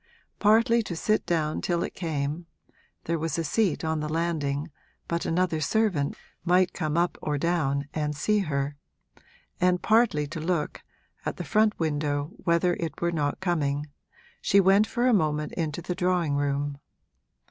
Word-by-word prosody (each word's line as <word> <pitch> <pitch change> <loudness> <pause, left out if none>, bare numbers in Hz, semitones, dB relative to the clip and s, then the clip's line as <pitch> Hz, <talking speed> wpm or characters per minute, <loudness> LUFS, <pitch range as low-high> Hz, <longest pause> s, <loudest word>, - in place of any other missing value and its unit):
Partly 230 +3 +4
to 190 -6 -5
sit 215 +4 0
down 155 -3 0
till 170 -1 0
it - - -4
came 155 0 -3 0.6
(there 165 0 -1
was 160 0 -2
a 165 - 0
seat 175 +1 0
on 160 0 0
the 150 0 -3
landing, 155 -2 -1 0.4
but 170 0 -2
another 165 -2 +1
servant 180 -5 +1 0.3
might 180 +1 +3
come 155 -1 -2
up 175 +1 +1
or 150 -1 -1
down 145 -4 0
and 150 -1 -1
see 210 +8 +1
her), 145 -5 -2 0.8
and 180 -1 +2
partly 215 -10 +3
to 160 +3 -6
look, 165 -1 -2 0.4
at - - -3
the - - -4
front 215 0 +2
window, 145 -1 -1
whether 175 0 +2
it 165 -2 -4
were 170 0 +1
not 145 -2 -1
coming, 150 -5 -1 0.5
she 200 - +4
went 195 +3 +5
for 240 +3 0
a 255 - +4
moment 150 -5 +1
into 165 0 -3
the 180 - -2
drawing 180 -4 +1
room. 140 0 -1
165 Hz, 160 wpm, -27 LUFS, 150-180 Hz, 0.8 s, went